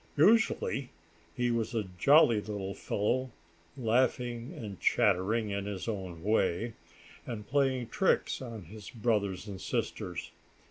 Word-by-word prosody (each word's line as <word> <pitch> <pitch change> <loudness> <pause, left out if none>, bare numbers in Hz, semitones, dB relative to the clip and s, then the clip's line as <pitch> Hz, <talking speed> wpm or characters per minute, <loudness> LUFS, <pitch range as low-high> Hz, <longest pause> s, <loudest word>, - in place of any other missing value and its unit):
Usually 170 - +3 0.5
he 120 0 +1
was 115 0 -1
a 110 - +1 0.2
jolly 140 - +6
little 100 -2 -4
fellow, 125 +8 -1 0.5
laughing 120 +1 0
and 105 - -7
chattering 105 +4 +2
in 100 0 -2
his 100 -1 -5
own 95 -6 -4
way, 105 +1 +1 0.5
and 105 -4 -5
playing 130 -3 +1
tricks 190 +1 +1
on 115 -5 -7
his 100 +4 -10
brothers 105 -4 -1
and 95 -2 -7
sisters. 85 -1 -3
110 Hz, 125 wpm, -31 LUFS, 100-125 Hz, 0.5 s, jolly